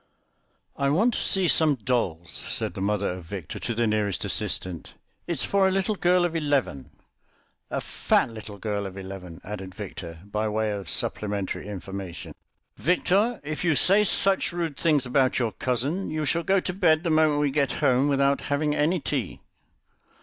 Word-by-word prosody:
"I 140 0 +1
want 215 - +3
to - - -1
see 190 -3 +2
some 155 -3 +4
dolls," 100 -9 -2
said - - -2
the - - -6
mother 100 0 0
of 90 -1 -7
Victor 90 -3 -6
to 115 - -3
the 120 +1 +1
nearest 105 -3 0
assistant; 90 -3 -3 0.3
"it's 170 -6 +2
for 195 -1 +3
a - - +2
little 195 +3 0
girl 180 -2 +3
of 170 -1 -2
eleven." 145 - 0 0.8
"A - - -2
fat - - +1
little 110 -2 -9
girl 100 0 -2
of 95 0 -10
eleven," 95 -3 -8
added 95 -2 -7
Victor 85 -1 -8
by 105 +1 -2
way 110 0 0
of 100 -5 -5
supplementary 100 -2 -2
information. 95 -3 -7 0.4
"Victor, 195 - +2
if 150 +2 -4
you 165 -3 +3
say 200 +8 +5
such 195 -1 +3
rude 170 -4 -3
things 150 -3 +2
about 130 +1 +2
your 120 -3 0
cousin, 135 - -2
you 155 0 -2
shall 170 +4 +1
go 195 +2 +2
to 180 - -3
bed 170 -4 +3
the 170 - 0
moment 155 -2 +3
we 145 -1 +1
get 140 -2 +1
home, 130 +2 +2
without 140 0 +2
having 150 +1 +1
any 160 +5 +1
tea." - - -3
135 Hz, 175 wpm, -26 LUFS, 100-165 Hz, 0.8 s, say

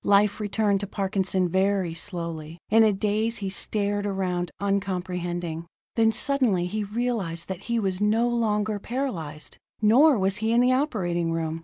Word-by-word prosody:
Life 205 +1 +4
returned 205 -1 +1
to 200 - -4
Parkinson 190 -2 0
very 190 -1 +1
slowly. 165 -3 -5
In 225 +1 +6
a 215 - +5
daze 215 +3 0
he 195 -2 -3
stared 205 0 -1
around, 180 -3 -1
uncomprehending. 180 -4 -2 0.3
Then 225 -1 +4
suddenly 235 -7 +1
he 210 +4 -2
realized 205 -6 -2
that 190 0 -6
he 235 - +1
was 190 -3 -1
no 220 +3 +3
longer 215 -3 0
paralyzed: 190 - -5 0.2
nor 255 +7 +5
was 190 0 +1
he 220 +1 0
in 235 - +4
the 250 +1 +4
operating 180 - 0
room. 165 -1 -2
200 Hz, 155 wpm, -25 LUFS, 180-220 Hz, 0.3 s, In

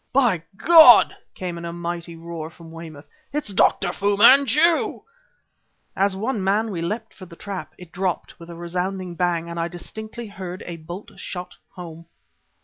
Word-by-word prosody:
"By 245 -10 +3 0.2
God!" 310 -5 +8 0.2
came 175 -2 -5
in 170 - -7
a 170 - -4
mighty 170 0 -5
roar 165 -1 -7
from 165 0 -14
Weymouth. 160 -3 -10 0.3
"It's 285 -8 -3
Dr. 180 -1 +2
Fu 200 +2 0
Manchu!" 280 +8 +5 0.9
As 195 0 +1
one 220 +1 -2
man 210 +3 +1
we 170 -4 -4
leapt 215 +6 -4
for 185 - -12
the 170 - -13
trap. 175 -5 -7
It 180 -2 -13
dropped, 185 -1 -3
with 170 0 -12
a 170 - -8
resounding 180 +2 -4
bang 170 -1 -1
and 170 0 -5
I 165 - 0
distinctly 220 +7 -8
heard 185 -3 -8
a 170 -1 -6
bolt 170 +5 -9
shot 180 -1 -7 0.2
home. 170 -2 -10
180 Hz, 165 wpm, -23 LUFS, 170-210 Hz, 0.9 s, God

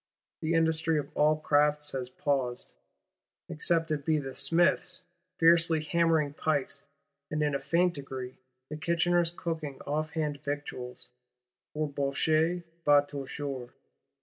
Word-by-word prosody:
The 160 +1 0
industry 160 0 +1
of 145 - -5
all 150 +1 +4
crafts 150 -1 +2
has 130 -2 -4
paused;—except 145 +5 -3
it 145 -2 -1
be 155 +1 +2
the 135 -3 -5
smith's, 175 +3 +4 0.3
fiercely 165 -1 +5
hammering 160 -2 +1
pikes; 145 -2 -2 0.4
and, 150 0 -1
in 145 -1 0
a 140 - 0
faint 170 +6 +1
degree, 130 -3 -7 0.4
the 155 - -5
kitchener's, 170 +1 +1
cooking 160 -5 -5
off 155 +2 -2
hand 150 -3 -2
victuals; 140 -4 -6 0.7
for 155 0 -1
bouche 155 +5 0 0.2
va 145 -1 +5
toujours. 140 -2 -6
150 Hz, 120 wpm, -29 LUFS, 140-165 Hz, 0.7 s, fiercely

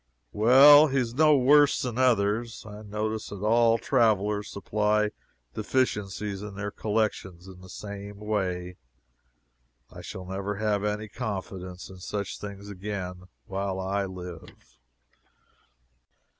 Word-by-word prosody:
Well, 140 +7 +8
he 135 -1 -1
is 120 -3 0
no 155 +2 +5
worse 145 +2 +5
than 125 -1 -3
others. 115 -2 +1
I 105 0 -9
notice 110 +1 -3
that 100 -1 -7
all 115 +1 +4
travelers 105 -5 +1
supply 105 +1 0 0.4
deficiencies 105 -4 -1
in 105 -1 -8
their 105 +1 -4
collections 100 -5 -2
in 95 -1 -12
the 95 - -13
same 100 +1 -8
way. 90 -4 -3 1.1
I - - -10
shall 95 - -8
never 100 +2 -4
have 105 0 0
any 105 +1 -2
confidence 95 -4 -6
in 95 - -12
such 100 +2 -4
things 100 0 -8
again 95 -2 -6 0.2
while 95 +2 -3
I 100 +1 -1
live. 90 -9 -11
105 Hz, 125 wpm, -27 LUFS, 95-110 Hz, 1.1 s, Well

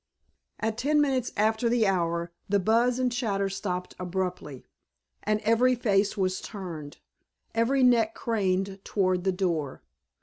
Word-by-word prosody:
At 220 +1 -2
ten 300 +3 +2
minutes 265 -4 +1
after 220 +3 +2
the 235 -2 +3
hour 170 -3 0 0.2
the 200 0 +3
buzz 230 +5 +2
and 255 -1 +1
chatter 200 -5 -1
stopped 180 -2 -4
abruptly 180 -6 -4 0.6
and 215 0 0
every 230 +4 +3
face 205 -3 +1
was 185 -1 0
turned, 170 -8 -7 0.6
every 255 +4 +2
neck 230 -3 +4
craned 195 -3 -1
toward 185 -2 0
the 190 - +3
door. 170 -7 -2
200 Hz, 135 wpm, -27 LUFS, 185-230 Hz, 0.6 s, neck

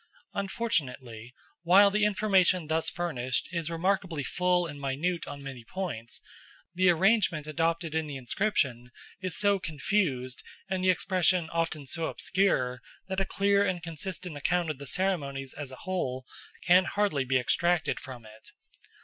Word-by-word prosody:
Unfortunately, 130 - -3 0.3
while 195 +4 +6
the 210 +1 +2
information 195 -4 +3
thus 160 +1 0
furnished 130 -8 -2
is 170 -2 -2
remarkably 170 -2 0
full 180 +4 +1
and 145 -3 -7
minute 155 +6 -1
on 140 -1 -7
many 135 -3 -8
points, 120 -7 -5 0.5
the 185 +1 +4
arrangement 180 -3 +3
adopted 165 +1 -1
in 160 -1 -1
the 145 - -6
inscription 130 - -1 0.3
is 185 -2 -1
so 200 -1 +3
confused 145 -6 -1 0.3
and 190 -1 -2
the 185 - +4
expression 180 -2 +2
often 165 -3 -1
so 160 +4 -1
obscure 130 -10 0 0.3
that 190 0 -1
a 195 - +1
clear 200 +1 +2
and 180 -4 -1
consistent 170 +1 -4
account 170 +3 0
of 145 - -8
the 140 - -7
ceremonies 140 -7 -1
as 145 -2 -6
a 130 - -8
whole 130 -9 -2 0.4
can 185 +1 +6
hardly 200 -9 +1
be 130 0 +2
extracted 170 +7 +1
from 125 -4 -10
it. 110 0 -14
165 Hz, 150 wpm, -29 LUFS, 135-185 Hz, 0.5 s, while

